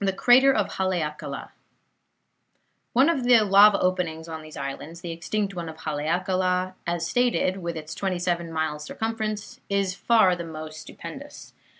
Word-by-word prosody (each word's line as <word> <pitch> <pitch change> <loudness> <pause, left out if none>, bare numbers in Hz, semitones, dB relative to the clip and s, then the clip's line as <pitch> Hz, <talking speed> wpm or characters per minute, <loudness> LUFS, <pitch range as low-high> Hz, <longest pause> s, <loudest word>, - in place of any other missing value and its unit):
CRATER 255 +6 +6
OF 210 -7 +1
HALEAKALA 155 -6 -3 1.4
Of 275 +2 +4
the 245 -2 +6
lava 200 0 +6
openings 175 -3 -1
on 160 -1 -6
these 155 0 -11
islands, 145 +5 -6
the 170 - -5
extinct 200 +4 -2
one 170 -3 -5
of 160 - -10
Haleakala, 180 +4 0
as 170 -1 -1
stated, 235 -2 +1
with 170 -3 -4
its 155 0 -7
twenty 190 -2 -2
seven 175 -1 -1
miles 160 -2 -2
circumference, 215 +2 -4
is 200 -2 0
far 195 -2 +4
the 175 - -5
most 155 -1 -8
stupendous. 275 - -10
180 Hz, 140 wpm, -25 LUFS, 160-205 Hz, 1.4 s, CRATER